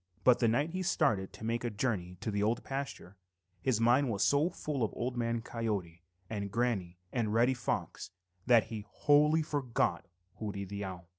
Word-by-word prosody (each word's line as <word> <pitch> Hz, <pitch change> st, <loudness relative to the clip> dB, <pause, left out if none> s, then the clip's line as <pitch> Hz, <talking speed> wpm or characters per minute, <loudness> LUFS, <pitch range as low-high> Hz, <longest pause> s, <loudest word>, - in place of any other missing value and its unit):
But 125 Hz, -1 st, +6 dB
the 120 Hz, -, +3 dB
night 145 Hz, +8 st, +1 dB
he 185 Hz, +2 st, -3 dB
started 140 Hz, -, +1 dB
to -, -, -11 dB
make 115 Hz, +2 st, -1 dB
a 120 Hz, -, 0 dB
journey 100 Hz, -5 st, -2 dB
to 110 Hz, -, -2 dB
the 100 Hz, 0 st, -1 dB
Old 110 Hz, +3 st, +1 dB
Pasture, 135 Hz, -8 st, -5 dB, 0.4 s
his 125 Hz, -1 st, +1 dB
mind 120 Hz, +4 st, +4 dB
was 100 Hz, -3 st, 0 dB
so 145 Hz, +4 st, +3 dB
full 150 Hz, -6 st, -4 dB
of 110 Hz, -, +2 dB
Old 125 Hz, +1 st, -2 dB
Man 115 Hz, -1 st, -1 dB
Coyote 100 Hz, -9 st, -3 dB, 0.3 s
and 100 Hz, -1 st, -3 dB
Granny 105 Hz, -7 st, -1 dB, 0.2 s
and 110 Hz, -3 st, 0 dB
Reddy 120 Hz, +3 st, +4 dB
Fox 120 Hz, -1 st, -3 dB, 0.4 s
that 120 Hz, -3 st, +6 dB
he 105 Hz, -2 st, -4 dB
wholly 150 Hz, +2 st, +4 dB
forgot 140 Hz, -5 st, -1 dB, 0.3 s
Hooty 100 Hz, -2 st, -4 dB
the 100 Hz, +1 st, -5 dB
Owl. 90 Hz, -2 st, -7 dB
115 Hz, 180 wpm, -32 LUFS, 100-130 Hz, 0.4 s, But